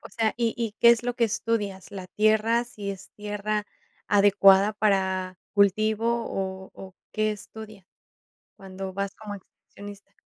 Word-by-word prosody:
O - - -11
sea 225 -2 -1
y 230 -2 0
y 230 -3 -3
¿qué 235 - +8
es 235 -1 +3
lo 245 0 -2
que 235 - +2
estudias? 205 -3 -2
¿La 190 -2 -7
tierra 220 +4 +2
si 210 -4 -6
es 190 -1 -9
tierra 210 0 -3 0.4
adecuada 200 0 +5
para 190 -3 0 0.2
cultivo 215 +3 +2
o 190 0 -5
o, 190 -1 -11 0.2
qué 215 0 0
estudias 210 -1 -11 0.7
cuando 190 0 -7
vas 200 +1 -3
como 210 -2 -7
excursionista? 200 +1 -13
205 Hz, 145 wpm, -26 LUFS, 195-220 Hz, 0.7 s, qué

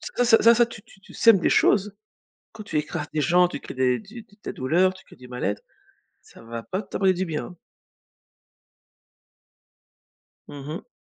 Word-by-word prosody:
ça 245 - +2
ça 230 0 +6
ça 240 - +4
tu 225 -2 -12
tu 195 - -21
tu - - -16
sèmes 230 -4 +5
des - - +1
choses, 205 0 +2 0.6
quand 220 - -10
tu 180 - -3
écrases 150 -1 -3
des 155 - 0
gens, 180 +3 +4
tu - - -7
crées - - -9
des 125 -1 +1
du 220 +2 -12 0.2
des - - -5
douleurs, 175 +8 +1
tu 190 - -16
crées - - -17
du 125 -2 -14
mal-être, 115 -5 -3 0.6
ça - - -17
va 115 0 -7
pas 190 - -4
t'apporter 190 -1 +1
du 185 +1 -2
bien, 155 -3 -4
hein. 175 - -13 2.9
Mmh 140 -1 -9
mh. 170 +10 -7
180 Hz, 180 wpm, -24 LUFS, 145-210 Hz, 2.9 s, ça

